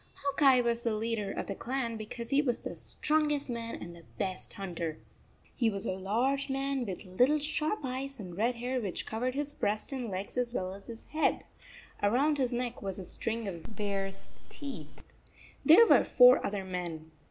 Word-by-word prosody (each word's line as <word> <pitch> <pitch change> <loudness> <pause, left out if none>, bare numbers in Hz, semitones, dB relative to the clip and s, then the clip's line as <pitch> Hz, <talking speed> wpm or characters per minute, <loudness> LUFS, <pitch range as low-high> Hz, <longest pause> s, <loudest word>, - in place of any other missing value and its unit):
Hawk 280 +1 -3
Eye 265 -3 +7
was 235 -1 0
the 230 -2 0
leader 215 -2 -1
of - - -3
the - - -3
clan, 240 +2 -2
because 225 +2 -6
he 275 +1 +5
was 250 -5 0
the - - -6
strongest 300 -3 0
man 230 -1 -4
and 170 0 -8
the 170 - -13 0.2
best 185 -1 -2
hunter. 170 -5 -4 0.6
He 235 -3 +2
was 200 -2 -4
a - - 0
large 240 +9 0
man 270 -2 -1
with 190 +1 -5
little 250 +11 +3
sharp 305 +6 -1
eyes 265 +1 -4
and 180 -4 -7
red 235 +5 +1
hair 250 +2 -2
which 195 -5 -4
covered 250 +4 -2
his 290 0 0
breast 210 +5 -1
and 250 -4 -3
legs 195 +5 -5
as 245 -1 -1
well 185 0 -2
as 195 0 -12
his 230 -1 -9
head. 310 +1 +1 0.6
Around 275 +8 +3
his 255 -2 +2
neck 245 0 -2
was 195 -2 -4
a 190 - -6
string 225 +4 -3
of 190 +3 -7
bear 200 -1 -1
s 195 0 -10 0.2
teeth. 285 -2 -8 0.6
There 345 +9 +9
were - - +6
four 250 +1 +7
other 200 -1 -2
men. 170 -4 -5
235 Hz, 195 wpm, -31 LUFS, 195-270 Hz, 0.6 s, There